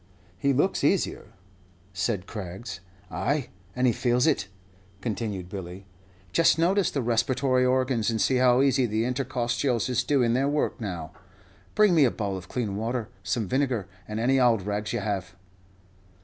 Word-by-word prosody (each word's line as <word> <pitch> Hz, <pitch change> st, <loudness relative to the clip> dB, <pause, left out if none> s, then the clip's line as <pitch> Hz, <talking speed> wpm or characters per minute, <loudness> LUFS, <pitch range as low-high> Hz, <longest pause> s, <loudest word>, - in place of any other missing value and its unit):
"He 140 Hz, +9 st, +1 dB
looks 145 Hz, +8 st, +1 dB
easier," -, -, 0 dB, 0.6 s
said 100 Hz, -1 st, -1 dB
Craggs. 95 Hz, -1 st, -7 dB, 0.3 s
"Ay, 120 Hz, -, -1 dB, 0.3 s
and 125 Hz, +1 st, +1 dB
he 120 Hz, -, +4 dB
feels 125 Hz, +2 st, +1 dB
it," 145 Hz, -12 st, +1 dB, 0.5 s
continued 105 Hz, -3 st, -3 dB
Billy. 95 Hz, 0 st, -8 dB, 0.5 s
"Just 165 Hz, +4 st, +4 dB
notice 185 Hz, +3 st, +2 dB
the 140 Hz, -, -2 dB
respiratory 125 Hz, +2 st, +2 dB
organs, 130 Hz, -3 st, +1 dB
and 115 Hz, -1 st, -1 dB
see 130 Hz, +4 st, +2 dB
how 125 Hz, +1 st, +4 dB
easy 130 Hz, -2 st, +3 dB
the 110 Hz, +1 st, 0 dB
intercostials 125 Hz, -1 st, -1 dB
is 125 Hz, 0 st, +1 dB
doing 125 Hz, -4 st, +2 dB
their 135 Hz, +3 st, +2 dB
work 145 Hz, -4 st, -1 dB
now. 90 Hz, -6 st, -5 dB, 0.6 s
Bring 210 Hz, -3 st, +5 dB
me 160 Hz, -4 st, +5 dB
a -, -, +4 dB
bowl 100 Hz, -4 st, -3 dB
of 95 Hz, 0 st, -8 dB
clean 110 Hz, -6 st, -2 dB
water, 115 Hz, +1 st, -2 dB
some 95 Hz, +4 st, -2 dB
vinegar, 130 Hz, -5 st, 0 dB, 0.2 s
and 105 Hz, +1 st, -4 dB
any 130 Hz, +3 st, +3 dB
ould 120 Hz, -6 st, +3 dB
rags 105 Hz, +1 st, -2 dB
you -, -, -2 dB
have." 95 Hz, -5 st, -3 dB
120 Hz, 160 wpm, -26 LUFS, 100-130 Hz, 0.6 s, Bring